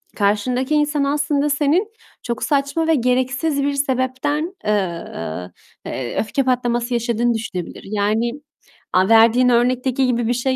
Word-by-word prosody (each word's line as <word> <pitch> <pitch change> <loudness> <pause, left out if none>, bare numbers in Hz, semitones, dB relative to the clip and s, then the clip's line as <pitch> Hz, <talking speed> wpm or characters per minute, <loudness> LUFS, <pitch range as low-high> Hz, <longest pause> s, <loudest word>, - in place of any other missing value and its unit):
karşındaki 245 +7 +1
insan 295 -1 +1
aslında 290 +1 0
senin 295 +7 +2 0.4
çok 235 0 -3
saçma 285 +3 0
ve 325 - +4
gereksiz 265 +4 0
bir 285 0 0
sebepten, 280 +5 -1
eee, 170 - -3 0.4
eee, 125 -2 -4
öfke 245 +5 0
patlaması 245 -1 0
yaşadığını 235 0 +1
düşünebilir. 220 -6 -5
Yani, 215 +3 0 0.6
aaa, 185 +1 +3
verdiğin 230 +3 +5
örnekteki 250 +2 +2
gibi 240 -2 0
bir 240 - +2
şey 260 +2 0
250 Hz, 130 wpm, -20 LUFS, 225-280 Hz, 0.6 s, verdiğin